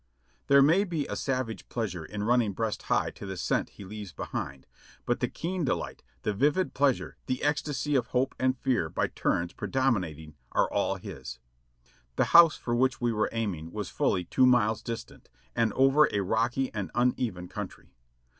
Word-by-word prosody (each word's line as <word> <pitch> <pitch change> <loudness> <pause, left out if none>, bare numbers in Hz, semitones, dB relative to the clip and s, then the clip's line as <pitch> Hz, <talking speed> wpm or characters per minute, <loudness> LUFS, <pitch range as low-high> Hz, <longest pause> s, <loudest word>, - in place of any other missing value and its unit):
There 140 0 +7
may 165 +8 +5
be 165 -7 -2
a - - -4
savage 130 -4 -3
pleasure 100 -8 -3
in 105 +5 -5
running 115 -2 +2
breast 110 +1 -2
high - - +2
to - - -10
the 95 -1 -5
scent - - 0
he 100 - -11
leaves 105 -1 -7
behind, 65 -1 -5 0.4
but - - 0
the - - +1
keen 180 +1 -3
delight, 135 - -2 0.2
the 105 - 0
vivid 150 - +1
pleasure, 140 -2 +1
the 130 - -2
esctasy 150 0 0
of 125 -3 +2
hope 130 +1 0
and 130 0 +2
fear 120 -11 0
by - - 0
turns 85 +1 -1
predominating, 90 - -1 0.2
are - - +3
all - - +1
his. 60 - -8 0.8
The - - +3
house 170 -2 +8
for 120 - -3
which 130 +2 +2
we 120 -1 +1
were 110 0 +1
aiming 95 -8 -3
was 105 -4 -4
fully 90 - +1
two 130 +8 +4
miles 115 -3 +3
dis 115 -1 -4
tant - - -19 0.3
and 115 -2 +2
over 135 +3 +5
a 100 - 0
rocky 120 +6 0
and 105 -3 -3
uneven 120 -7 0
country. - - -8
120 Hz, 180 wpm, -28 LUFS, 100-135 Hz, 0.8 s, house